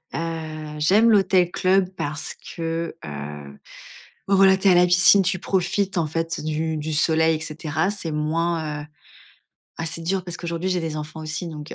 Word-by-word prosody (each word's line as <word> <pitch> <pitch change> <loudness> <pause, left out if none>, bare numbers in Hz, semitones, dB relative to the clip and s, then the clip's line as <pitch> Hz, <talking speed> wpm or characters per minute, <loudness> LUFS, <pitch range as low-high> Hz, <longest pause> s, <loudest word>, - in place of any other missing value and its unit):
heu, 155 -2 -5
j'aime 205 +9 +4
l'hôtel-club 185 -2 +3
parce 150 +1 -4
que, 165 0 -5
heu, 75 -1 -8 0.7
bah 195 - +3
voilà, 190 0 +6
tu 195 - 0
es 190 - +7
à - - +5
la 180 0 +6
piscine, 180 +3 +6
tu 185 0 0
profites 190 +1 -1
en 160 - +1
fait 165 +2 -3
du 155 0 -2
du 155 +1 -4
soleil 160 +1 +3
et - - -10
cetera. 160 +3 -2
C'est 185 -6 -5
moins, 155 0 -1
heu - - -13 0.9
ah 165 - -3
c'est 165 +1 -5
dur 185 +2 -1
parce 175 -2 -6
qu'aujourd'hui, 170 +1 -3
j'ai 180 -1 0
des 160 -2 -4
enfants 155 +1 -7
aussi, 155 +3 -4
donc, 150 -1 -8
heu, - - -7
165 Hz, 185 wpm, -23 LUFS, 155-180 Hz, 0.9 s, es